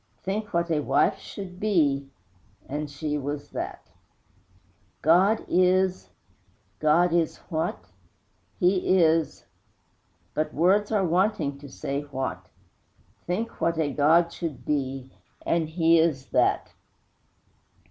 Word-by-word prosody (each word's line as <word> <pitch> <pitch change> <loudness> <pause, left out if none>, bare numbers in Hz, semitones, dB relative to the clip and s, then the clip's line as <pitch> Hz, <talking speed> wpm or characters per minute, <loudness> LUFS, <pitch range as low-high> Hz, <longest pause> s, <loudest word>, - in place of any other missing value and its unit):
Think 205 +2 -3
what 170 0 0
a 155 - +2
wife 140 -1 +2
should 185 -2 -9
be 145 -10 +1 0.6
And 150 +2 -4
she 150 +1 -3
was 145 +1 -5
that! - - -6 1.1
God 185 +7 +4
is! 185 - +2 0.7
God 165 +3 +3
is 170 -2 +1
what? 160 -2 -3 0.7
He 185 +1 +3
is, 165 -3 +2 0.9
But 155 0 -2
words 195 +7 +3
are 205 -3 +2
wanting 170 -5 0
to 140 0 -11
say 140 +1 -4
what! 130 -11 -5 0.8
Think 210 +7 -3
what 165 -1 +1
a 150 -3 0
God 165 +4 +3
should 165 -5 -6
be 135 -2 -2 0.3
And 165 -2 0
He 165 0 +4
is 155 -5 0
that! - - +1
165 Hz, 115 wpm, -26 LUFS, 145-180 Hz, 1.1 s, God